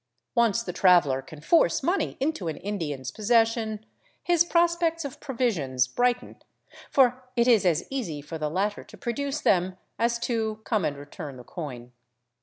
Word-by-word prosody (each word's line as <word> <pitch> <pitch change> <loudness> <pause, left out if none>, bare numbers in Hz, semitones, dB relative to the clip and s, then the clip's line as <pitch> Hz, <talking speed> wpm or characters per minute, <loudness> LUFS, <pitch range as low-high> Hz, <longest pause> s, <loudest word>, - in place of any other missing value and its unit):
Once 235 -2 +2
the 180 - -5
traveler 170 -9 +4
can 145 +3 -12
force 320 - +3
money 355 +7 0
into 275 - -1
an 155 -3 -3
Indian's 150 -11 -4
possession, 225 - +1 0.4
his 345 -1 +4
prospects 340 -1 +1
of 280 +2 -7
provisions 185 - 0
brighten, 245 - -1 0.5
for 255 -1 +3
it 235 0 +3
is 225 -6 +5
as 170 -1 +1
easy 205 - -3
for 155 +3 -7
the 150 -1 -1
latter 200 +6 -1
to - - -15
produce 280 +5 -3
them 185 0 +2 0.2
as 235 +1 +2
to 220 -2 -2
come 215 -7 0
and 145 - -2
return 145 -1 -8
the 125 - -10
coin. 125 -5 -7
220 Hz, 160 wpm, -26 LUFS, 155-250 Hz, 0.5 s, is